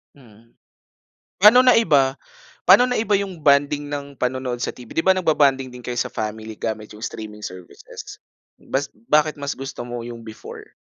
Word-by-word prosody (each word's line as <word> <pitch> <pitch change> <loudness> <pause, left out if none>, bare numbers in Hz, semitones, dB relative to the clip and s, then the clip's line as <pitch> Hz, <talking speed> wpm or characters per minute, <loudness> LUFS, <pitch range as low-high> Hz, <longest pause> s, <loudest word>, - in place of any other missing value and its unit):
Mm, 115 -4 -20 0.9
paano 220 +6 +8
naiba 155 - +4 0.5
paano 245 - +8
naiba 230 -4 +1
yung 195 -3 -3
bonding 145 0 +2
ng 140 -2 -7
panonood 125 -1 -2
sa - - -3
TV. 120 -2 -13
Di - - +1
ba 190 0 +4
nagbo-bonding 145 -7 +2
din 125 0 -11
kayo 120 +1 -4
sa - - -1
family 110 0 -5
gamit 110 -1 -4
yung 105 - -13
streaming 105 -2 -7
services? 90 -3 -10 0.4
Bas 140 +1 -3 0.2
bakit 150 0 +2
mas 140 0 -3
gusto 135 -2 -7
mo 120 -1 -5
yung 120 0 -8
before? 110 - -11
135 Hz, 160 wpm, -21 LUFS, 115-150 Hz, 0.9 s, paano